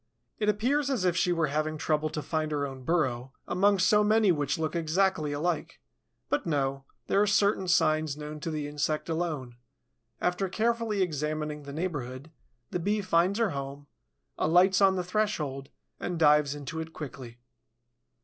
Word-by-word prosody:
It 210 -1 +1
appears 260 +8 +1
as 245 -9 0
if 175 -2 +2
she 180 0 +2
were 165 -2 +2
having 155 +2 -1
trouble 155 0 0
to 150 -1 -4
find 155 +1 -2
her 145 -1 0
own 135 -1 -7
burrow 130 -4 -1
among 200 +2 +3
so 200 +3 +4
many 215 -1 +4
which 145 -4 0
look 160 +1 -2
exactly 165 -1 +1
alike. 165 +2 -2 0.5
But 145 - -1
no, 135 -3 -1 0.2
there 200 - +2
are 210 - +3
certain 200 -1 +2
signs 155 -4 +2
known 150 0 -7
to 165 - -4
the 150 -2 -3
insect 150 +2 -2
alone. 155 -8 -3 0.6
After 180 +2 0
carefully 225 -1 0
examining 150 -2 -3
the 140 -1 -9
neighborhood, 145 -3 -4 0.4
the 180 - -1
Bee 205 +4 0
finds 185 +1 +2
her 230 -5 +1
home, 140 0 -6 0.5
alights 185 +4 +4
on 190 -1 +5
the 180 - -1
threshold, 170 -9 -2 0.3
and 180 - -3
dives 150 -2 +4
into 145 +3 -6
it 160 0 -6
quickly. 130 -5 -8
160 Hz, 165 wpm, -28 LUFS, 145-190 Hz, 0.6 s, on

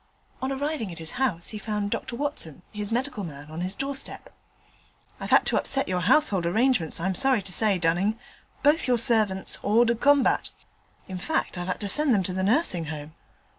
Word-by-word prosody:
On 260 +1 -2
arriving 275 - -2
at 170 - -9
his 160 -1 -4
house 185 -11 0
he 215 - -5
found 210 -2 -3
Dr 240 - -3
Watson, 235 - -3
his 210 0 -5
medical 245 -3 -2
man, 145 -3 -9
on 160 +2 -5
his 185 +2 0
doorstep. 275 0 -5 0.9
'I've - - -6
had - - +5
to - - +1
upset 275 0 +1
your 185 -1 0
household 195 - +3
arrangements, 220 - +1
I'm 190 +3 -1
sorry 260 -1 +2
to 185 -1 -2
say, 210 -2 +2
Dunning. 180 +6 +1 0.5
Both 295 +2 +3
your 250 -1 +3
servants 215 -5 +1
hors 225 +4 +4
de 235 - +2
combat. 275 +3 +2 0.5
In 185 -1 -6
fact, 320 - -1
I've 175 0 -5
had 185 - -2
to 205 - -2
send 285 +3 +3
them 195 - +1
to 185 - -2
the 190 - -2
Nursing 195 - +2
Home.' 150 0 -7
210 Hz, 195 wpm, -26 LUFS, 180-260 Hz, 0.9 s, had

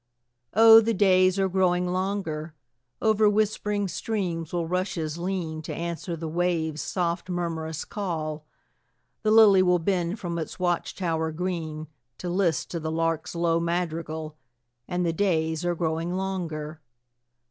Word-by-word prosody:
Oh, 225 +1 +9
the 225 0 0
days 185 -1 +4
are 195 -1 +2
growing 180 -1 +2
longer; 180 -4 -2 0.5
Over 215 -1 +4
whispering 210 -1 0
streams 175 -5 -3
will 175 -1 -1
rushes 170 -3 -2
lean, 170 -3 -3
To 160 - -6
answer 170 +1 -4
the 165 0 -5
waves' 160 -2 -1
soft 175 0 -2
murmurous 165 -3 -3
call; 160 -6 -4 0.8
The 215 - +1
lily 215 -3 +7
will 180 -1 +4
bend 175 +2 -1
from 170 -2 -3
its 160 - -5
watch 175 -2 -1
tower 160 -4 -1
green, 160 -2 -3 0.3
To 180 - -4
list 175 -5 0
to 170 - -2
the 160 0 -3
lark's 165 0 -1
low 170 -1 +2
madrigal, 165 -2 -3 0.5
And 180 0 -1
the 165 - +1
days 160 -3 0
are 175 0 0
growing 165 +1 -1
longer. 165 -5 -4
175 Hz, 140 wpm, -26 LUFS, 160-185 Hz, 0.8 s, Oh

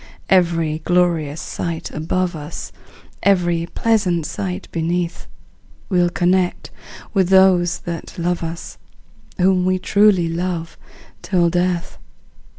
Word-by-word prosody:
Every 165 -4 +2
glorious 165 -3 +1
sight 165 +1 -4
above 175 +3 -1
us, 150 -1 -7 0.5
Every 175 -4 +2
pleasant 185 -7 +1
sight 95 -7 -4
beneath, 170 +1 -2 0.6
We'll 175 -3 +3
connect 180 +1 0 0.4
with 190 -4 +2
those 190 -2 +5
that 170 -1 -6
love 175 0 -1
us, 165 0 -6 0.6
Whom 185 -1 +3
we 185 0 +2
truly 195 -2 +3
love 165 0 -3 0.5
till 175 -3 +1
death! 180 0 -1
175 Hz, 105 wpm, -20 LUFS, 165-185 Hz, 0.6 s, those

